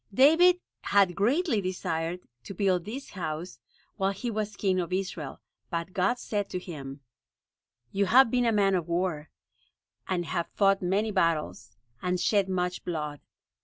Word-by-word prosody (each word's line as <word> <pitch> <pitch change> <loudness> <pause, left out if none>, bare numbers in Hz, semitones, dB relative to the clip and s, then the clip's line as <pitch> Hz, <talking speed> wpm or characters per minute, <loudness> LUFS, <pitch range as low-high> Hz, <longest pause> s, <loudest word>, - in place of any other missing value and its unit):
David 325 - +6 0.2
had 200 -3 +3
greatly 240 - +2
desired 180 -2 -3 0.2
to 195 - -7
build 185 -3 +1
this 260 +6 -7
house 165 -1 -5 0.4
while 195 0 +1
he 235 +5 -4
was 215 -1 -3
king 190 -2 +1
of 175 0 -3
Israel, 180 -7 -3 0.3
but 170 +2 -3
God 195 +6 +1
said 205 -4 -3
to - - -3
him: 140 -6 -8 0.9
"You 200 0 +1
have 245 +2 +6
been 245 -1 +2
a 230 - +3
man 200 -2 +3
of 175 -3 0
war, 170 -3 -1 0.8
and 175 -2 -1
have 170 0 -2
fought 195 -1 +3
many 200 +4 +1
battles, 155 - -1 0.2
and 180 0 0
shed 200 -1 +2
much 180 -1 -1
blood. 150 -4 -4
185 Hz, 155 wpm, -28 LUFS, 170-205 Hz, 0.9 s, David